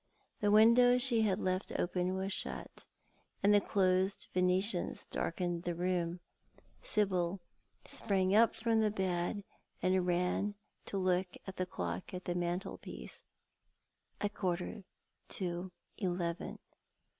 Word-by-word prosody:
The 205 Hz, -, +2 dB
window 235 Hz, +4 st, +7 dB
she 245 Hz, -3 st, +4 dB
had 205 Hz, -3 st, +2 dB
left 185 Hz, 0 st, -1 dB
open 180 Hz, +1 st, 0 dB
was 190 Hz, +1 st, -2 dB
shut, -, -, -5 dB, 0.6 s
and 205 Hz, +1 st, +6 dB
the 205 Hz, -, +6 dB
closed 190 Hz, 0 st, +1 dB
Venetians 180 Hz, +1 st, +1 dB
darkened 175 Hz, 0 st, -2 dB
the 175 Hz, -1 st, -2 dB
room. 175 Hz, 0 st, -1 dB, 0.6 s
Sibyl 190 Hz, -3 st, +1 dB, 0.5 s
sprang 195 Hz, -3 st, 0 dB
up 225 Hz, +2 st, +5 dB
from 225 Hz, -1 st, +2 dB
the 215 Hz, -, +3 dB
bed, 190 Hz, 0 st, -1 dB, 0.4 s
and 185 Hz, 0 st, +2 dB
ran 180 Hz, +3 st, +1 dB, 0.3 s
to 200 Hz, -, -2 dB
look 185 Hz, -1 st, +1 dB
at 190 Hz, -, -8 dB
the 185 Hz, -, -1 dB
clock 90 Hz, -, -4 dB
on 180 Hz, -, -4 dB
the 175 Hz, -, -2 dB
mantelpiece. 175 Hz, +1 st, -4 dB, 1.0 s
A 205 Hz, -, +2 dB
quarter 185 Hz, +1 st, -3 dB, 0.4 s
to 180 Hz, 0 st, -2 dB, 0.3 s
eleven. 175 Hz, -3 st, -2 dB
185 Hz, 120 wpm, -34 LUFS, 180-205 Hz, 1.0 s, window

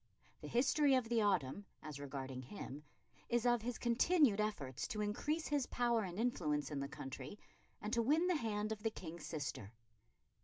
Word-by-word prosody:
The -, -, -6 dB
history 275 Hz, +3 st, +4 dB
of 250 Hz, -3 st, +1 dB
the 235 Hz, -2 st, +3 dB
autumn, 195 Hz, -2 st, +1 dB, 0.2 s
as 150 Hz, -2 st, -6 dB
regarding 135 Hz, -2 st, -5 dB
him, 140 Hz, 0 st, -7 dB, 0.5 s
is 240 Hz, 0 st, +2 dB
of 240 Hz, -2 st, +4 dB
his 240 Hz, +1 st, -3 dB
continued 240 Hz, -, +4 dB
efforts 145 Hz, -, -2 dB
to 210 Hz, -, -2 dB
increase 295 Hz, +10 st, -1 dB
his 290 Hz, -3 st, +1 dB
power 240 Hz, -2 st, +2 dB
and 185 Hz, -3 st, -4 dB
influence 155 Hz, -, 0 dB
in 145 Hz, -, -2 dB
the 140 Hz, -, -2 dB
country 135 Hz, +8 st, -7 dB, 0.5 s
and 210 Hz, +2 st, -3 dB
to 235 Hz, -, +4 dB
win 300 Hz, +9 st, +3 dB
the 360 Hz, -1 st, +3 dB
hand 215 Hz, -5 st, -1 dB
of 215 Hz, -1 st, -3 dB
the 225 Hz, -, +1 dB
King's 170 Hz, -6 st, -7 dB
sister. 140 Hz, -, -4 dB
210 Hz, 180 wpm, -38 LUFS, 150-240 Hz, 0.5 s, history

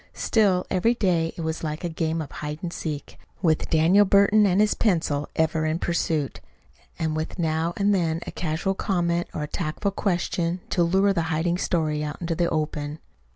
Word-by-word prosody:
Still, 195 Hz, -5 st, +2 dB
every 225 Hz, +7 st, +2 dB
day 170 Hz, -7 st, +1 dB
it -, -, -4 dB
was 160 Hz, 0 st, -3 dB
like 155 Hz, +1 st, -4 dB
a -, -, 0 dB
game 160 Hz, -1 st, -2 dB
of 145 Hz, -, -11 dB
hide 150 Hz, 0 st, -5 dB
and 175 Hz, -1 st, -3 dB
seek, 150 Hz, -3 st, -5 dB, 0.2 s
with 160 Hz, -3 st, +2 dB
Daniel 170 Hz, +6 st, +5 dB
Burton 205 Hz, +1 st, +5 dB
and 185 Hz, +1 st, +2 dB
his 210 Hz, 0 st, +4 dB
pencil 160 Hz, -8 st, 0 dB
ever 160 Hz, 0 st, +1 dB
in 155 Hz, +1 st, 0 dB
pursuit, 165 Hz, -4 st, -1 dB, 0.6 s
and 160 Hz, -1 st, -1 dB
with 155 Hz, +1 st, -4 dB
now 160 Hz, -1 st, 0 dB
and 205 Hz, 0 st, +3 dB
then 165 Hz, -4 st, +1 dB
a -, -, -6 dB
casual 170 Hz, +3 st, -1 dB
comment 175 Hz, -3 st, 0 dB
or 150 Hz, -, -4 dB
a -, -, -3 dB
tactful 175 Hz, +5 st, -2 dB
question 175 Hz, -2 st, -1 dB
to 175 Hz, -, +2 dB
lure 190 Hz, +4 st, +3 dB
the 170 Hz, -, 0 dB
hiding 170 Hz, +2 st, 0 dB
story 155 Hz, -4 st, 0 dB
out 150 Hz, 0 st, -5 dB
into 170 Hz, -1 st, -2 dB
the 170 Hz, +1 st, +1 dB
open. 150 Hz, -1 st, -2 dB
170 Hz, 190 wpm, -25 LUFS, 155-185 Hz, 0.6 s, Daniel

